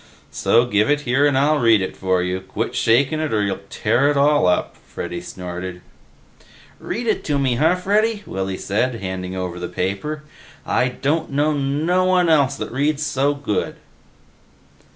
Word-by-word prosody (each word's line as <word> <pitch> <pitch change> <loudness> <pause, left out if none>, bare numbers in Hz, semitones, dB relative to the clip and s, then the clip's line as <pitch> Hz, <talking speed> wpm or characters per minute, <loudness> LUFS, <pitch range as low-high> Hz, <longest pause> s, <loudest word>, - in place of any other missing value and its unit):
"So 120 +1 +3
give 105 -1 +1
it 145 0 +2
here 140 +2 +2
and 140 -2 +1
I'll 150 +2 +3
read 115 -4 +5
it 95 - -4
for 95 -1 0
you. 90 +1 -2
Quit 95 - -4
shakin' 135 +7 +2
it 155 -1 -2
or 105 -2 +1
you'll 95 -1 -2
tear 125 +6 +1
it 145 - +1
all 145 -6 +4
up," 90 - 0
Freddy 85 0 -7
snorted. 90 0 -7 1.0
"Read 235 +6 -4
it 220 - 0
to 145 -2 0
me, 135 -3 +1
huh, 160 +6 +3
Freddy," 210 +3 0
Willy 95 0 -3
said, 120 +5 -1
handing 95 -3 -5
over 90 -1 -4
the 90 - -4
paper. 100 - -3 0.4
"I 125 - +1
don't 145 +6 -1
know 145 +2 +1
no 150 +6 +1
one 180 -2 +3
else 140 -4 +3
that - - -5
reads 145 +4 0
so 140 0 +1
good." 140 -7 -2
135 Hz, 170 wpm, -21 LUFS, 95-150 Hz, 1.0 s, read